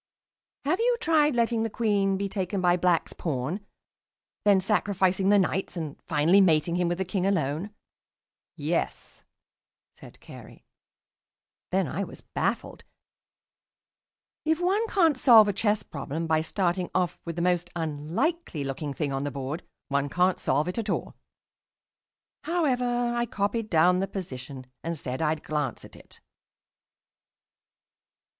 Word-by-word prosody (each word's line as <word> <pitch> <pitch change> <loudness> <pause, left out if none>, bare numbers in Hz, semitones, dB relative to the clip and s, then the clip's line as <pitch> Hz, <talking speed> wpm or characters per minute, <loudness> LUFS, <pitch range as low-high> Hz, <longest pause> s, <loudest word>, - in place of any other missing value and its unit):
"Have 325 +8 +1
you 480 +1 +2
tried 305 - +3
letting 235 -1 +1
the 225 - 0
Queen 205 -3 +1
be 200 +1 -1
taken 195 0 -2
by 175 -1 +3
Black's 180 -2 +1
pawn, 155 +6 -3 0.8
then 200 -2 +6
sacrificing 190 -1 +1
the 205 - +6
Knights, 190 -1 0
and 155 -4 -4
finally 165 +5 +4
mating 170 -2 +3
him 175 -1 +1
with 175 0 -1
the 190 - -1
King 185 0 -2
alone?" 170 -1 0 0.9
"Yes," - - -3 0.7
said - - -15
Carey. - - -13 1.0
Then 190 0 +1
I 175 +9 -2
was - - -9
baffled. - - -3 1.6
If 320 +1 +1
one 390 +6 +1
can't 330 -10 +3
solve 225 -5 +8
a 205 - +1
chess 210 +1 +1
problem 150 +3 -5
by 160 -1 +2
starting 180 +1 -1
off 180 -2 0
with 170 -1 -5
the 170 - -1
most 175 -1 +1
unlikely 165 - -2
looking 140 +1 -4
thing 140 +1 -2
on 135 0 -2
the 145 - -1
board, 140 +5 -4 0.3
one 140 0 0
can't 180 +3 +2
solve 145 +5 +1
it 180 +5 -2
at 220 -2 -3
all. - - -2 1.3
However, 250 -7 +1
I 240 0 0
copied 210 +2 -2
down 180 +2 +4
the 195 - 0
position 135 -8 -7 0.2
and 165 0 -3
said 130 -1 -4
I'd 155 -1 0
glance 150 -6 -3
at - - -15
it.... - - -17
185 Hz, 140 wpm, -27 LUFS, 155-215 Hz, 1.6 s, solve